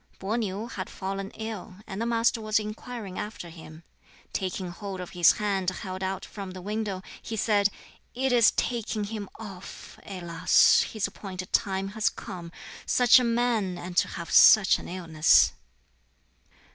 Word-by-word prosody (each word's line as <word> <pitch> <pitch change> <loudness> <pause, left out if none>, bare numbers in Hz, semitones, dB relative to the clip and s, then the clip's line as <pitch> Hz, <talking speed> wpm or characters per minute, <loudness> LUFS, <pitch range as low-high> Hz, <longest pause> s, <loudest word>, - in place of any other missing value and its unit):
Peh 200 +4 -2
niu 210 -2 -2
had 195 -6 -6
fallen 195 +1 -5
ill, 220 -3 -6
and 195 +2 -6
the 230 - 0
Master 230 0 +2
was 215 0 +1
inquiring 215 -1 -5
after 210 -5 -6
him. 160 -1 -12 0.5
Taking 185 -1 -3
hold 195 +1 -7
of 180 - -7
his 175 -1 +5
hand 195 -3 0
held 185 0 -6
out 190 0 -3
from 200 -2 -8
the 185 0 -8
window, 205 -2 -3 0.2
he 225 - -5
said, 205 -2 +2 0.5
"It 265 +1 0
is 235 -2 +6
taking 225 -3 -2
him 205 -1 -5
off! 195 -4 -10
Alas, 175 -3 +4
his 215 -3 -1
appointed 185 -2 -7
time 195 -1 +1
has 215 +1 +1
come! 170 -2 -8 0.4
Such 245 +1 +6
a - - 0
man, 230 -6 0
and 175 +1 -7
to - - +4
have 170 -1 -7
such 210 -3 +7
an - - -9
illness!" 165 -3 +4
195 Hz, 160 wpm, -27 LUFS, 185-220 Hz, 0.5 s, such